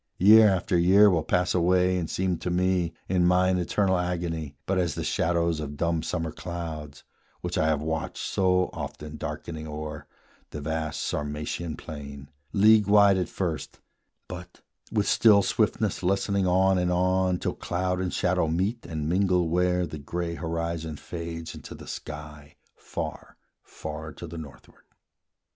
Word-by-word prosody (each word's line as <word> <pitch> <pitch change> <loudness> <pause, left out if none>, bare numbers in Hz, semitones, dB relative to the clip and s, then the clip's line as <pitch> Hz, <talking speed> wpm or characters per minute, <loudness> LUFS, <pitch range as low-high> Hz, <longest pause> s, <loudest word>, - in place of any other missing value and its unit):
Year 105 +3 +8
after 90 -2 +1
year 100 +4 +6
will 85 -3 +2
pass 90 +3 +1
away 90 +1 +3
and 85 -3 -2
seem 95 -2 0
To - - -3
me, 90 -1 +1 0.2
in 90 -1 +2
mine 90 +1 +3
eternal 95 +1 +1
agony, 85 -4 -3
But 95 -1 +1
as 85 -2 0
the - - -3
shadows 85 -1 +1
of 75 -1 -5
dumb 85 0 0
summer 80 0 -3
clouds, 80 -5 -6 0.4
Which - - -3
I 80 - +2
have 75 -1 +1
watched 80 0 -3
so 90 -1 +1
often 75 0 -7
darkening 80 0 -6
o'er 75 -1 -6 0.4
The 75 - -6
vast 80 +1 -3
Sarmatian 75 +2 -3
plain, 70 -2 -9 0.2
league 105 0 +5
wide 100 -1 +6
at 90 - -2
first, 80 -7 -4 0.5
But, 90 0 -9 0.3
with 105 -2 +1
still 105 -3 +5
swiftness - - 0
lessening 100 +1 +1
on 95 +1 +3
and 90 0 +1
on 90 0 +2
Till - - -2
cloud 90 +1 -2
and 90 -1 -2
shadow 90 -2 +1
meet 95 +9 -1
and 80 -2 -3
mingle 90 -1 +2
where 90 +1 +2
The 75 - -7
gray 85 +4 -3
horizon 85 -1 -3
fades 85 -1 -6
into - - -9
the - - -11
sky, 75 -1 -8 0.2
Far, - - -6 0.2
far 80 0 -7
to 85 - -8
the 85 0 -7
northward. 70 -6 -12
85 Hz, 155 wpm, -27 LUFS, 80-90 Hz, 0.5 s, Year